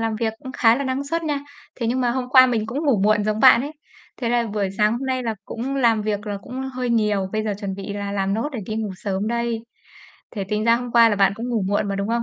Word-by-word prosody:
làm 225 -1 -1
việc 220 -1 -1
cũng 260 -3 -9
khá 225 -2 +4
là 280 - -2
năng 265 +1 -2
suất 330 +4 -2
nha, 290 -2 -1 0.3
thế 235 - -3
nhưng 250 +3 0
mà 245 -1 +2
hôm 250 0 -2
qua 255 0 +7
mình 225 -3 -1
cũng 275 +8 -3
ngủ 245 -8 +3
muộn 210 0 +3
giống 215 +1 -1
bạn 255 -3 +8
ấy. 285 +3 -5 0.4
Thế 235 - -2
là 235 -1 +1
buổi 205 -2 -1
sáng 210 +1 +4
hôm 260 +3 -3
nay 255 -1 -1
là 225 -2 -2
cũng 265 +4 -4
làm 230 -5 +3
việc 210 0 -2
là 205 -1 -3
cũng 255 +2 -6
hơi 250 -1 -2
nhiều, 210 -4 +1
bây 215 0 -1
giờ 210 - -1
chuẩn 195 -2 -3
bị 200 +1 -6
là 200 0 -4
làm 195 0 0
nốt 230 +7 -1
để 235 - -4
đi 215 - -3
ngủ 220 -2 -2
sớm 195 +1 -3
đây. 235 -1 -1 0.7
Thế 200 -4 -4
tính 210 0 -1
ra 230 0 +5
hôm 245 0 -6
qua 235 -1 +7
là 210 - 0
bạn 195 0 +4
cũng 235 +3 -5
ngủ 230 -4 0
muộn 205 0 0
mà, 195 - -2
đúng 200 +1 -2
không? 235 +1 0
225 Hz, 290 wpm, -22 LUFS, 210-250 Hz, 0.7 s, bạn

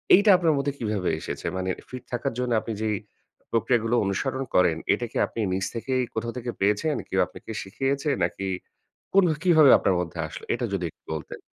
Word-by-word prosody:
এইটা 205 +2 +4
আপনার 165 -3 +3
মধ্যে 140 0 0
কীভাবে 105 -5 -1
এসেছে? - - -6
মানে 95 0 -2 0.2
ফিট 130 -1 -7
থাকার 120 - -1
জন্য 125 -1 -1
আপনি 115 - -4
যেই 105 -1 +1 0.6
প্রক্রিয়াগুলো 115 +1 +2
অনুসরণ 130 +7 -1
করেন 85 -3 +4 0.2
এটা 120 - -2
কি - - -4
আপনি - - -8
নিজ 95 0 0
থেকেই 130 +2 0
কোথাও 115 +1 -3
থেকে 120 0 -3
পেয়েছেন? 105 +10 +2
কেউ 95 - 0
আপনাকে - - -10
শিখিয়েছে 135 +8 -1
নাকি? 95 -1 -2 0.6
কোন 195 -1 +6 0.2
কীভাবে 160 -6 +7
আপনার 95 - +1
মধ্যে 85 -3 -4
আসলো? - - -9
এটা - - -2
যদি 90 -3 -1
একটু - - -62
বলতেন। 75 - -7
115 Hz, 180 wpm, -26 LUFS, 100-135 Hz, 0.6 s, কীভাবে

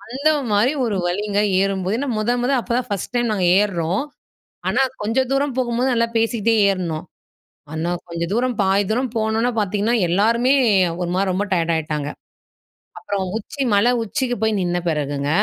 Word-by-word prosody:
அந்தமாரி 260 -3 +1
ஒரு 210 -4 -1
வலிங்க, 200 +3 -1 0.2
ஏறும்போது. 195 +1 0
ஏன்னா, 280 0 -2
முத, 215 +3 0
முத 250 - +1
அப்பதான் 245 +2 -2
ஃபர்ஸ்ட் 200 +4 -3
டைம் 240 -2 +1
நாங்க 190 -3 0 0.2
ஏறுறோம். 185 0 0 0.7
ஆனா, 245 +8 +2 0.2
கொஞ்ச 225 +5 0
தூரம் 275 -1 0
போகும்போது, 245 +1 0
நல்லா 230 0 +2
பேசிக்கிட்டே 225 0 +1
ஏறுனோம். 180 -4 -2 0.7
ஆனா, 160 +2 -2 0.2
கொஞ்சம் 170 +1 -3
தூரம் 245 -1 0
பாதி 195 +1 +2
தூரம் 250 0 -1
போனோன 220 +3 0
பார்த்தீங்கன்னா, 210 +4 0
எல்லாருமே 230 +8 +3 0.5
ஒரு 175 -1 -2
மாரி 190 0 +1
ரொம்ப 200 +3 -1
டயர்ட் 170 -2 +1
ஆயிட்டாங்க. 150 -2 -3 0.9
அப்புறம் 200 -2 -3
உச்சி 275 +6 -7
மலை 215 +5 +4
உச்சிக்கு 245 +3 -2
போய் 220 -2 +2
நின்ன 175 0 0
பிறகுங்க, 145 -2 -2
210 Hz, 150 wpm, -21 LUFS, 185-240 Hz, 0.9 s, மலை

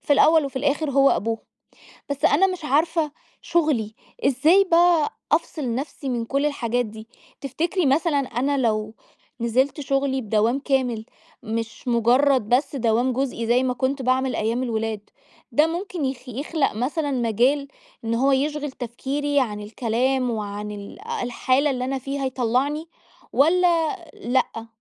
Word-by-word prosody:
في 290 - +1
الأول 315 +1 +5
وفي 275 -1 -6
الآخر 285 +2 0
هو 275 0 +5
أبوهم. 225 +2 0 0.7
بس 285 -1 -4
أنا 340 +7 +5
مش 365 -4 -5
عارفة 310 +2 +1 0.3
شغلي 280 -11 0 0.3
إزاي 315 +9 +4
بقي 340 -2 +4 0.2
أفصل 305 -6 0
نفسي 275 +1 -5
من 240 -2 -1
كل 275 +4 0
الحاجات 245 -4 -1
دي؟ 220 +1 -10 0.3
تفتكري 320 +5 -1
مثلاً، 290 +2 +2
أنا 275 +2 -1
لو 215 -3 0 0.5
نزلت 260 +6 +1
شغلي 275 -1 0
بدوام 220 +2 +1
كامل 260 -6 0 0.4
مش 230 +2 -5
مجرد 245 +1 +3
بس 265 +3 +1
دوام 240 +1 +1
جزئي 245 -3 -2
زي 245 +2 +3
ما 250 -1 0
كنت 265 +2 -1
باعمل 260 +1 +1
أيام 230 +4 0
الولاد، 225 -3 -2 0.5
ده 300 - +4
ممكن 345 -1 -4
يخ 260 -1 -4
يخلق 280 +5 -1
مثلاً 285 +6 -1
مجال 255 +3 +1 0.4
إن 225 - 0
هو 270 +4 +3
يشغل 295 +2 0
تفكيري 275 +4 -2
عن 210 -5 -2
الكلام 245 +4 0
وعن 210 -1 -4
ال 205 - -9 0.2
الحالة 255 +4 +1
اللي 250 -2 -2
أنا 270 +1 -2
فيها 275 +1 -3
يطلعني 260 +5 0 0.5
والّا 335 +3 +3 0.2
لأ؟ 235 -2 -1
265 Hz, 145 wpm, -23 LUFS, 235-290 Hz, 0.7 s, الأول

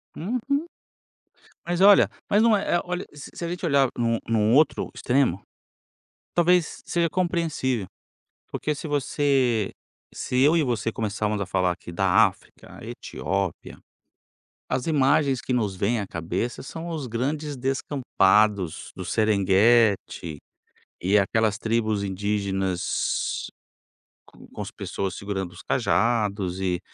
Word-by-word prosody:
Uhum. 255 - -1 1.0
Mas 175 +1 -1
olha, 200 0 +7 0.2
mas 205 +2 +4
não 225 -2 +5
é 195 - 0
é - - +1
olha, 180 +1 -3
se 145 -1 -10
se - - -6
a - - -2
gente 175 +1 -5
olhar 140 -4 +4
em - - 0
um 115 -1 +1
em 115 - +2
um 110 +2 +3
outro 150 +1 +3
extremo, 125 -8 +1 0.9
talvez 175 -1 +2
seja 170 -1 +1
compreensível. 165 - -1 0.7
Porque 150 - -2
se 155 - -6
você 135 -6 +1 0.4
se 125 - -3
eu 150 +4 +5
e 165 - +3
você 115 -4 -1
começarmos 105 -1 -2
a - - -1
falar 90 -1 +1
aqui 85 0 -8
da 95 +4 +4
África, 95 - -13
Etiópia, 95 +1 -4 0.9
as 130 +2 -1
imagens 140 -3 +2
que - - -3
nos 105 -6 0
vêm 110 +5 0
à 100 - -4
cabeça 85 +9 -3
são 165 +5 -7
os 155 -6 -4
grandes 145 +5 -2
descampados 110 - +1
do 95 - -6
Serenguetti, 100 -4 +2 0.6
e 95 +4 +3
aquelas 105 +1 +2
tribos 110 -2 0
indígenas, 95 -2 -1 0.8
com - - -12
as - - -6
pessoas 95 -2 -4
segurando 95 -3 -4
os 90 - -11
cajados 105 -6 0
e 90 -2 0
115 Hz, 135 wpm, -25 LUFS, 100-145 Hz, 1.0 s, olha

